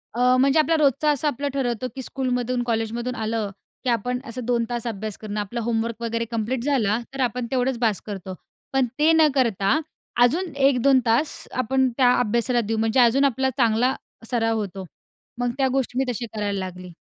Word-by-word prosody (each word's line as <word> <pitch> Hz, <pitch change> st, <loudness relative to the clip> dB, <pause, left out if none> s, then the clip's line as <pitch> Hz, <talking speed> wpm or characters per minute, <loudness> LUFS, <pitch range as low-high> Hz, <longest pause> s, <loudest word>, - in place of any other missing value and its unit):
अ, 250 Hz, +1 st, +4 dB
म्हणजे 275 Hz, +3 st, +4 dB
आपला 320 Hz, +1 st, +3 dB
रोजचा, 295 Hz, 0 st, +2 dB
असं 295 Hz, +1 st, 0 dB
आपलं 285 Hz, 0 st, -1 dB
ठरवतो 255 Hz, -3 st, -1 dB
की 265 Hz, -, -5 dB
स्कूलमधून, 250 Hz, -1 st, -1 dB
कॉलेजमधून 235 Hz, +1 st, -2 dB
आलं, 220 Hz, -2 st, -2 dB, 0.3 s
की 255 Hz, -, 0 dB
आपण 245 Hz, +2 st, 0 dB
असं 245 Hz, +2 st, -5 dB
2 240 Hz, -1 st, +1 dB
तास 240 Hz, -1 st, -3 dB
अभ्यास 215 Hz, -2 st, -4 dB
करणं, 210 Hz, -1 st, -5 dB
आपलं 210 Hz, +4 st, -4 dB
होमवर्क 230 Hz, 0 st, -2 dB
वगैरे 230 Hz, 0 st, -1 dB
कम्प्लीट 235 Hz, +2 st, -2 dB
झाला, 230 Hz, -7 st, +2 dB
तर 270 Hz, -, -7 dB
आपण 250 Hz, -1 st, 0 dB
तेवढंच 260 Hz, -1 st, +1 dB
बास 220 Hz, -5 st, +1 dB
करतो. 190 Hz, -3 st, -6 dB, 0.4 s
पण 270 Hz, -1 st, +3 dB
ते 310 Hz, +2 st, +5 dB
न 320 Hz, -1 st, +6 dB
करता 235 Hz, 0 st, +2 dB, 0.4 s
अजून 330 Hz, +8 st, +2 dB
1-2 270 Hz, -1 st, +4 dB
तास 240 Hz, +7 st, +2 dB, 0.2 s
आपण 260 Hz, +1 st, +2 dB
त्या 250 Hz, -2 st, +5 dB
अभ्यासाला 240 Hz, +1 st, +1 dB
देऊ, 225 Hz, 0 st, -2 dB
म्हणजे 225 Hz, +3 st, +2 dB
अजून 250 Hz, +3 st, +5 dB
आपला 265 Hz, 0 st, +1 dB
चांगला 240 Hz, +1 st, +3 dB, 0.4 s
सराव 225 Hz, -2 st, +1 dB
होतो. 195 Hz, -2 st, -5 dB, 0.5 s
मग 245 Hz, 0 st, 0 dB
त्या 270 Hz, -1 st, +2 dB
गोष्टी 265 Hz, -2 st, -1 dB
मी 265 Hz, -, +2 dB
तशी 240 Hz, 0 st, -4 dB
करायला 205 Hz, -2 st, -1 dB
लागली. 185 Hz, -1 st, -7 dB
240 Hz, 185 wpm, -23 LUFS, 225-265 Hz, 0.5 s, न